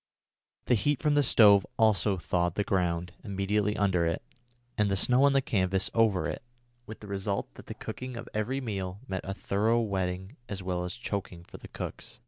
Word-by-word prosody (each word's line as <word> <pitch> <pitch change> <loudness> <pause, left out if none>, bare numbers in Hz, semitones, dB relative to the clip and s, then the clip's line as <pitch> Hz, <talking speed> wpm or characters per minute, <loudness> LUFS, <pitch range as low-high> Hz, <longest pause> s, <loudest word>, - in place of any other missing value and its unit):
The - - +2
heat 145 +5 +2
from 150 -1 +2
the 145 - +4
stove 105 -6 +6
also 105 -3 +3
thawed 85 0 0
the 105 - +1
ground 90 -3 -1
immediately 105 +1 0
under 95 -4 +2
it, 85 - -2 0.5
and 105 -1 +2
the 100 - +1
snow 125 +7 +4
on 140 - +4
the 135 -1 +3
canvas 95 -3 +1
over 110 -5 +3
it, - - -4 0.5
with 110 - -9
the 105 - -9
result 100 0 -3
that - - -14
the - - -6
cooking 130 -1 -6
of 115 - -7
every 120 +6 -1
meal 100 -5 -4
meant 95 -5 -4
a 95 - -3
thorough 110 +5 +1
wetting 95 0 -2
as 95 -2 -5
well 90 -1 -2
as 90 - -5
a - - -19
choking 95 -6 -4
for - - -12
the - - -11
cooks. - - -7
100 Hz, 200 wpm, -29 LUFS, 95-115 Hz, 0.5 s, stove